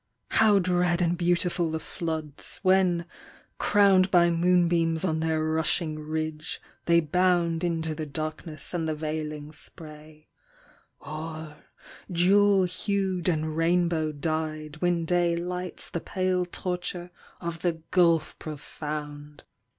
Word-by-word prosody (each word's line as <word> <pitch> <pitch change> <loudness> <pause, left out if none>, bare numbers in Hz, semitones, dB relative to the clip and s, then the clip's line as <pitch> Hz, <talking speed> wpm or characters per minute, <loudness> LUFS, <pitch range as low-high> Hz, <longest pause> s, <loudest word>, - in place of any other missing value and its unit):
How 215 -2 +5
dread 180 -1 +2
and 175 -1 +2
beautiful 175 -1 +1
the 160 0 -2
floods, 160 -3 -4
when, 185 -2 +3 0.5
crowned 195 -2 +4
By 175 -2 +5
moonbeams 170 -1 +2
on 160 -3 0
their 160 -1 0
rushing 155 0 0
ridge, 155 +1 -4 0.3
they 170 0 +5
bound 170 0 +1
Into 165 -2 -1
the 155 0 -5
darkness 155 +2 -5
and 165 -2 -1
the 155 - -1
veiling 150 -1 -4
spray; 155 0 -10 0.7
Or, 155 0 -7 0.5
jewel 195 +3 +4
hued 185 -1 -1
and 155 -2 -1
rainbow 165 -1 +2
dyed, 155 0 -3
when 175 0 +1
day 175 0 +2
Lights 180 +1 -4
the 170 - -4
pale 185 -1 0
torture 180 0 -4 0.3
of 170 -1 -4
the 175 -2 +1 0.2
gulf 170 -4 +3
profound! 150 -1 -7
165 Hz, 120 wpm, -27 LUFS, 155-180 Hz, 0.7 s, How